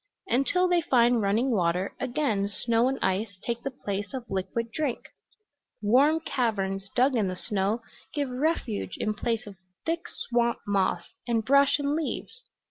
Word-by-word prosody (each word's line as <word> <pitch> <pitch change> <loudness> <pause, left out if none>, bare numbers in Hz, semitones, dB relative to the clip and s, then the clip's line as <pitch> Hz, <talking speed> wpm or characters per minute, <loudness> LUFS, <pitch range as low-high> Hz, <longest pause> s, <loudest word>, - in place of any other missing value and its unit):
Until 360 +4 +2
they 355 -1 +3
find 240 -5 +4
running 220 +6 +2
water 180 -2 +1
again 245 -6 0
snow 230 +3 +1
and 265 +1 0
ice 195 +1 0
take 235 0 -2
the 275 - -2
place 205 -3 -4
of 255 -2 -5
liquid 225 +5 -2
drink; 285 -2 -2 0.7
warm 270 +9 +4
caverns 195 -9 -1
dug 255 +2 +4
in 215 -4 +2
the 185 - -2
snow 205 +4 -1 0.3
give 290 -2 -1
refuge 255 -5 -1
in 215 - 0
place 225 +1 -2
of 200 -2 -10 0.3
thick 330 +1 -1
swamp 235 -1 0
moss 195 -4 0
and 225 -2 +1
brush 280 +2 +5
and 285 0 0
leaves. 330 +9 -4
235 Hz, 155 wpm, -27 LUFS, 205-275 Hz, 0.7 s, brush